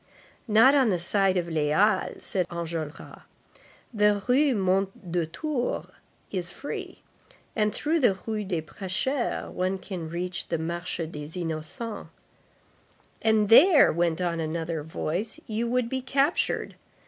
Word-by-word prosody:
"Not 225 Hz, +5 st, +6 dB
on 270 Hz, -5 st, +4 dB
the 185 Hz, -, +2 dB
side 190 Hz, +2 st, +2 dB
of 175 Hz, -, 0 dB
the 160 Hz, -3 st, -1 dB
Halles," 190 Hz, +6 st, +1 dB
said 185 Hz, -3 st, -1 dB
Enjolras. 165 Hz, -2 st, -6 dB, 0.7 s
"The 210 Hz, -1 st, +3 dB
Rue 265 Hz, +1 st, +4 dB
Mondétour 190 Hz, -, -1 dB, 0.4 s
is 180 Hz, -3 st, -2 dB
free, 270 Hz, +11 st, -7 dB, 0.5 s
and 210 Hz, -1 st, +2 dB
through 320 Hz, +8 st, 0 dB
the 240 Hz, -9 st, +4 dB
Rue 215 Hz, -2 st, -2 dB
des 175 Hz, -5 st, -2 dB
Prêcheurs 195 Hz, -, -2 dB
one 185 Hz, +1 st, -1 dB
can 180 Hz, -4 st, -6 dB
reach 175 Hz, +2 st, -4 dB
the 165 Hz, -, -1 dB
Marché 170 Hz, +1 st, -3 dB
des 155 Hz, +2 st, -7 dB
Innocents." 170 Hz, +8 st, -5 dB, 1.1 s
"And 220 Hz, -2 st, +3 dB
there," 295 Hz, -, +7 dB
went 170 Hz, 0 st, +1 dB
on 170 Hz, -2 st, -1 dB
another 160 Hz, 0 st, -2 dB
voice, 170 Hz, +7 st, -3 dB
"you 225 Hz, +2 st, -2 dB
would 250 Hz, 0 st, +1 dB
be 260 Hz, +2 st, -2 dB
captured. 275 Hz, +5 st, 0 dB
190 Hz, 130 wpm, -27 LUFS, 170-225 Hz, 1.1 s, there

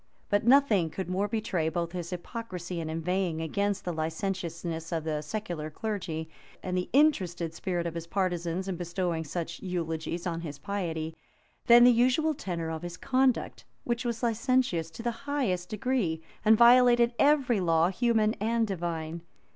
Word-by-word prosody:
But 205 Hz, +2 st, +1 dB
nothing 235 Hz, -, +5 dB
could 190 Hz, +3 st, -5 dB
more 195 Hz, +3 st, 0 dB
betray 195 Hz, -7 st, -1 dB
both 170 Hz, 0 st, -2 dB
his 175 Hz, -2 st, -5 dB
hypocrisy 180 Hz, -2 st, -5 dB
in 160 Hz, -1 st, -4 dB
inveighing 165 Hz, +1 st, -1 dB
against 200 Hz, +5 st, -1 dB
the 175 Hz, -, -2 dB
licentiousness 165 Hz, 0 st, -3 dB
of 165 Hz, -2 st, -1 dB
the 155 Hz, -1 st, -2 dB
secular 170 Hz, -2 st, -4 dB
clergy, 165 Hz, -4 st, -4 dB, 0.4 s
and 185 Hz, -1 st, -2 dB
the 180 Hz, 0 st, -1 dB
interested 185 Hz, -, +2 dB
spirit 175 Hz, 0 st, -2 dB
of 170 Hz, -, -3 dB
his 170 Hz, 0 st, -6 dB
partisans 180 Hz, -1 st, -1 dB
in 190 Hz, -3 st, -3 dB
bestowing 175 Hz, -1 st, -2 dB
such 170 Hz, +2 st, -5 dB
eulogies 170 Hz, -1 st, -3 dB
on 170 Hz, -2 st, -2 dB
his 150 Hz, -4 st, -6 dB
piety, 165 Hz, -5 st, -3 dB, 0.5 s
than 240 Hz, 0 st, +9 dB
the 245 Hz, -, +8 dB
usual 255 Hz, +7 st, +3 dB
tenor 170 Hz, -, -4 dB
of 160 Hz, -1 st, -4 dB
his 175 Hz, 0 st, -6 dB
conduct, 260 Hz, -1 st, +1 dB, 0.2 s
which 240 Hz, +1 st, -1 dB
was 235 Hz, -1 st, -3 dB
licentious 230 Hz, -7 st, +1 dB
to 165 Hz, +8 st, -9 dB
the 240 Hz, -, 0 dB, 0.2 s
highest 190 Hz, -12 st, -1 dB
degree, 215 Hz, -9 st, -1 dB, 0.2 s
and 220 Hz, 0 st, +6 dB
violated 240 Hz, 0 st, +6 dB
every 280 Hz, -6 st, +4 dB
law, 165 Hz, -1 st, +3 dB
human 220 Hz, +1 st, +2 dB
and 225 Hz, +2 st, +1 dB
divine. 170 Hz, -4 st, -4 dB
180 Hz, 160 wpm, -29 LUFS, 165-230 Hz, 0.5 s, than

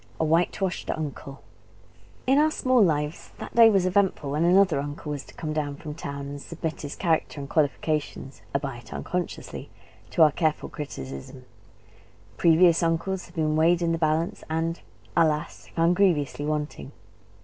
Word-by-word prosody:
A 160 Hz, -, +2 dB
WHITE 165 Hz, +3 st, +2 dB
WASHED 190 Hz, -3 st, -2 dB
UNCLE 140 Hz, -3 st, -5 dB, 0.8 s
In 270 Hz, +2 st, +4 dB
our 310 Hz, +1 st, +4 dB
small 255 Hz, -5 st, +2 dB
lives 150 Hz, -2 st, -1 dB
that -, -, -8 dB
day 230 Hz, -1 st, +8 dB
was 195 Hz, -4 st, +3 dB
eventful 185 Hz, -6 st, +1 dB
when 150 Hz, +3 st, +1 dB
another 180 Hz, -3 st, +4 dB
uncle 145 Hz, +1 st, -5 dB
was 145 Hz, -2 st, -4 dB
to -, -, -15 dB
come 155 Hz, -2 st, -4 dB
down 145 Hz, -2 st, -2 dB
from 150 Hz, +1 st, -7 dB
town, 140 Hz, -2 st, -6 dB
and 140 Hz, 0 st, -7 dB
submit 165 Hz, 0 st, -5 dB
his 145 Hz, -1 st, -6 dB
character 160 Hz, -4 st, 0 dB
and 140 Hz, -, -6 dB
qualifications 150 Hz, -2 st, -1 dB
(albeit 135 Hz, -4 st, -4 dB
unconsciously) 180 Hz, -2 st, -4 dB, 0.4 s
to 165 Hz, -, +4 dB
our 155 Hz, -, +6 dB
careful 155 Hz, 0 st, -1 dB
criticism. 70 Hz, -, -8 dB, 0.9 s
Previous 170 Hz, 0 st, +5 dB
uncles 170 Hz, +3 st, -1 dB
had 175 Hz, -, -20 dB
been 155 Hz, -2 st, +1 dB
weighed 170 Hz, +2 st, +3 dB
in 165 Hz, -, +1 dB
the 165 Hz, -, -1 dB
balance, 160 Hz, +1 st, 0 dB
and 165 Hz, +1 st, -1 dB, 0.4 s
alas! 155 Hz, -3 st, +1 dB
found 170 Hz, +1 st, +3 dB
grievously 150 Hz, -6 st, +1 dB
wanting. 150 Hz, -2 st, -3 dB
160 Hz, 160 wpm, -26 LUFS, 145-175 Hz, 0.9 s, day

